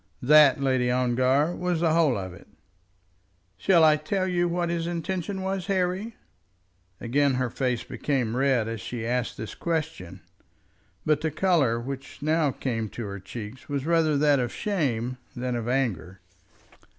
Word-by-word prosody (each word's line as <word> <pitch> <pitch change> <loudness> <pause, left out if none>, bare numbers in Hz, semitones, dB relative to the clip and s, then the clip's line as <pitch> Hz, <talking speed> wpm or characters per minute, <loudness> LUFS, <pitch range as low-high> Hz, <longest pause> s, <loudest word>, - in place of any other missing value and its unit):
That, 150 +1 +6
Lady 130 -2 +1
Ongar, 130 +5 +2
was 180 -2 -1
the 165 -2 +3
whole 160 -8 +3
of 95 -2 -5
it." 85 - -15 1.1
"Shall 170 - +4
I 155 -1 +6
tell 185 +5 -1
you 175 -1 +1
what 175 0 -1
his 170 -1 -2
intention 185 +3 -3
was, 190 0 -3
Harry?" 190 +3 -1 0.8
Again 135 +3 +1
her 125 -2 -1
face 125 -3 -1
became 125 -6 -2
red 130 -4 +2
as 115 -2 -4
she 115 +1 -5
asked 125 0 -1
this 110 - -6
question; 155 - -4 0.8
but 150 -1 +2
the 160 - 0
colour 155 -8 +2
which 135 +2 -7
now 155 0 +2
came 115 -5 -3
to 115 - -6
her 100 0 -6
cheeks 105 +7 -9
was 140 -1 -2
rather 160 -3 +2
that 145 -1 +4
of 120 -1 -1
shame 130 - -2 0.2
than 125 0 -2
of 120 -1 -3
anger. 100 -8 -1
140 Hz, 155 wpm, -26 LUFS, 120-165 Hz, 1.1 s, That